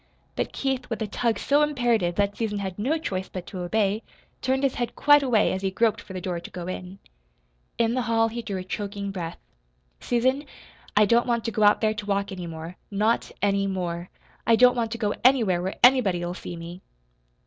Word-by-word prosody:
But - - -2
Keith, 270 -2 -2
with 225 - -3
a - - -3
tug 230 +2 0
so 290 +1 +2
imperative 240 -11 +1
that 200 +1 +1
Susan 215 -2 -2
had 190 -1 -4
no 275 +10 +1
choice 190 -11 -4
but 185 -2 -6
to 185 - -7
obey, 200 +3 0 0.4
turned 265 +1 0
his 270 -2 +2
head 240 -1 -3
quite 290 0 +6
away 245 -6 +2
as 190 - -3
he 195 - 0
groped 220 +3 +1
for 190 - -11
the 185 - -4
door 180 -2 -3
to 170 - -10
go 175 -1 -7
in. 185 +1 -6 0.8
In 230 0 +2
the 255 - 0
hall 225 -1 +2
he 235 +1 -5
drew 200 -4 -4
a 185 - -4
choking 200 +1 -4
breath. 175 -3 -5 0.6
"Susan, 260 +4 +1 0.5
I 210 - +7
don't 235 +4 +3
want 235 -2 0
to 230 - -1
go 215 - -2
out 205 0 +5
there 215 -1 +2
to 215 -1 -6
walk 200 0 0
any 180 -2 -6
more 165 +2 -8
NOT 215 +3 +1
ANY 200 -1 +2
MORE! 175 -2 -3 0.4
I 230 - +6
don't 250 +2 +6
want 230 -2 0
to - - -4
go 210 -2 0
anywhere 230 -9 +4
where 190 +2 -3
anybody'll 195 -9 +4
see 180 - -7
me." 170 +2 -8
205 Hz, 215 wpm, -25 LUFS, 185-235 Hz, 0.8 s, I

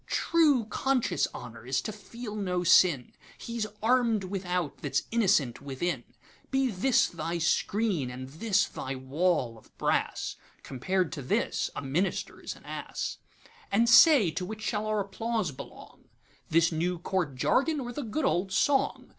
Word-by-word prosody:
'True, 300 -8 +3
conscious 255 +4 0
Honour 115 -1 -9
is 130 - +1
to - - -4
feel 215 +1 -8
no 180 -4 -1
sin; 165 -7 +4 0.2
He's 230 -2 -4 0.2
arm'd 230 -3 +3
without 180 -4 -3
that - - -6
's - - +3
innocent 195 - +2
within:Be 175 - -3
this 220 +7 +3
thy 170 +1 -3
screen, 175 - 0
and 130 +1 -7
this 200 +8 +1
thy 135 +1 -5
wall 130 -3 0
of - - -25
brass; - - -1 0.3
Compared 180 +7 -1
to 150 - -5
this 130 - 0
a - - -4
Minister's 160 +9 -2
an - - -18
Ass.And 235 - -4
say, 235 - +7
to 175 +4 -4
which 215 +3 -6
shall 210 0 -1
our 215 -1 +1
applause 215 -2 -2
belong, 130 - -12 0.4
This 165 +1 +3
new 175 +2 -1
Court 175 -5 -2
jargon, 285 - +1
or 245 -2 -4
the 290 - -4
good 270 +4 -2
old 190 +2 0
song? 275 +6 +1
190 Hz, 145 wpm, -28 LUFS, 160-230 Hz, 0.4 s, say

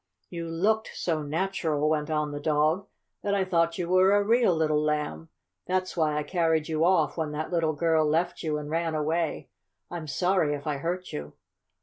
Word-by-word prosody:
"You 170 -1 -5
looked 210 +7 +1
so 160 -3 -1
natural," 155 -1 -1
went 155 0 0
on 150 -1 0
the 145 - -5
dog, 155 +6 +1 0.3
"that 200 0 0
I 195 -1 +1
thought 170 -2 +1
you 175 -2 -2
were 185 +2 +5
a 205 0 +4
real 225 -3 +3
little 155 -2 +2
Lamb. 150 - -2 0.4
That's 185 0 -1
why 155 -3 +1
I 150 - 0
carried 160 -2 +1
you 160 -1 0
off 185 +1 +3
when 155 -2 -2
that 155 +3 -4
little 165 -3 +1
girl 160 +1 +2
left 170 +3 0
you 155 -2 -1
and 150 -1 -6
ran 165 +1 -1
away. 160 +2 -1 0.4
I'm 170 -3 -5
sorry 175 +1 +1
if 145 - -9
I 150 -2 -1
hurt 175 +5 -4
you." 75 0 -6
160 Hz, 195 wpm, -27 LUFS, 150-180 Hz, 0.4 s, were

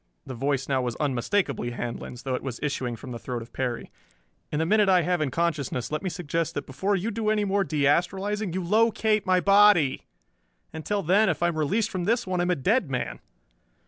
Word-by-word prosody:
The 130 - -6
voice 135 +2 -1
now 135 -2 +1
was 125 -2 -3
unmistakably 145 - -1
Handlon's, 120 0 -6
though 130 - -2
it 125 - -2
was 130 -3 -5
issuing 130 -4 -2
from 125 +3 -10
the 120 - -6
throat 120 -1 -5
of 115 - -17
Perry. 125 -3 -3 0.6
"In 150 - -1
the 160 - +1
minute 210 +2 +3
I 180 -2 +4
have 180 0 0
in 150 - 0
consciousness 140 -6 -2
let 155 - -2
me 190 - -2
suggest 165 -1 -3
that 145 - -3
before 190 +10 -1
you 200 +5 -2
do 215 0 -1
any 215 -1 +1
more 200 0 +1
de 155 -5 -1
astralizing 195 +6 0
you 185 +2 -3
locate 215 +1 +2
my 185 -1 +4
body. 195 -6 +4 0.7
Until 200 +6 -2
then, 195 +5 +4
if 165 0 -1
I 175 - +4
am 170 - -4
released 210 +9 0
from 180 -2 -3
this 230 +4 +1
one 185 -1 -2
I - - +2
am 175 - 0
a 180 - +3
dead 190 - +1
man." 125 -2 -3
170 Hz, 220 wpm, -26 LUFS, 135-200 Hz, 0.7 s, I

